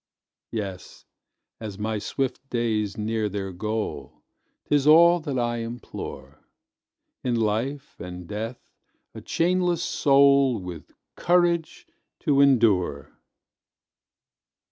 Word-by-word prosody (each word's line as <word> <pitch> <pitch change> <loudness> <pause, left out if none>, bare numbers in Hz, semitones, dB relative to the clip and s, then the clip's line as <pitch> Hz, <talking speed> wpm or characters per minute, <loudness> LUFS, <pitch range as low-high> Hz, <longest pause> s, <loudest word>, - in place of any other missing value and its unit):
Yes, 100 -5 -6 0.5
as 105 -3 -7
my 110 0 -2
swift 135 +4 -3
days 110 -4 -1
near 110 0 -1
their 95 -1 -4
goal 95 - -4 0.4
'Tis 145 -1 +2
all 170 +3 +7
that 145 -5 -4
I 120 -1 0
implore 115 - -7 0.8
In 125 -2 0
life 115 +6 -2
and 90 0 -8
death 110 +5 -6 0.4
a - - -9
chainless 175 0 +1
soul 140 -3 +4
With 90 -3 -8 0.3
courage 175 - +1 0.4
to 140 -2 +3
endure! 110 - +2
115 Hz, 100 wpm, -25 LUFS, 105-140 Hz, 0.8 s, all